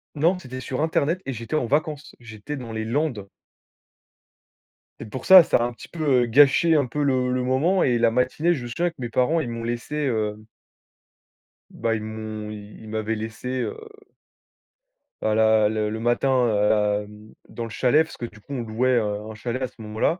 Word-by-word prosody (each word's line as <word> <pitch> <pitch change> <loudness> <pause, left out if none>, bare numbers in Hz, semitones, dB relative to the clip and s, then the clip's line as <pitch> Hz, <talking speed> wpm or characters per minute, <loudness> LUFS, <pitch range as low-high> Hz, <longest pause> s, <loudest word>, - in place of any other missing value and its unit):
Non, 165 +5 +2
c'était 130 -7 -8
sur 130 +1 -4
internet 160 +2 0
et 135 - -3
j'étais 115 +5 -5
en 155 - +1
vacances. 150 +3 -2
J'étais 120 +5 -8
dans 120 -3 -7
les 110 0 -3
Landes 120 -5 -2 1.7
c'est 110 - -8
pour 130 - -7
ça. 190 -2 +10
Ça - - +2
a 120 - 0
un 120 0 -2
petit 115 - -12
peu, 145 -7 +1
heu, - - +1
gâché 145 +6 +5
un 145 -3 +3
peu 145 +4 -2
le 130 -2 +1
le 125 0 0
moment, 150 +9 +2
et 125 -2 +2
la 115 -1 +3
matinée, 130 +8 +1
je 135 -7 -5
me - - -6
souviens 175 +9 -1
que 170 - -17
mes 120 -2 -4
parents, 130 +8 +2
ils 130 - -3
m'ont 115 0 -5
laissé, 120 +5 -4
heu 110 -4 -2 1.3
bah 115 -1 -1
ils 110 - -4
m'ont 110 -1 -6
ils 105 0 -10
Ils 110 - -11
m'avaient 110 +1 -2
laissé, 115 +4 -4
heu - - -3 1.5
bah, 110 0 +1
la 110 -1 +4
le 110 -1 -1
le 110 - -4
matin, 125 +2 +2
hem, 105 0 0 0.2
dans 120 - -6
le - - -7
chalet, 130 +7 +3
parce 160 - -12
que, 120 - -4
du 110 -2 -12
coup, 125 +7 -10
on 130 - -2
louait, 115 +3 0
heu, 105 -2 -1
un 110 - -8
chalet 120 +4 -4
à 130 - 0
ce - - -22
moment-là 110 - -1
120 Hz, 205 wpm, -24 LUFS, 110-140 Hz, 1.7 s, ça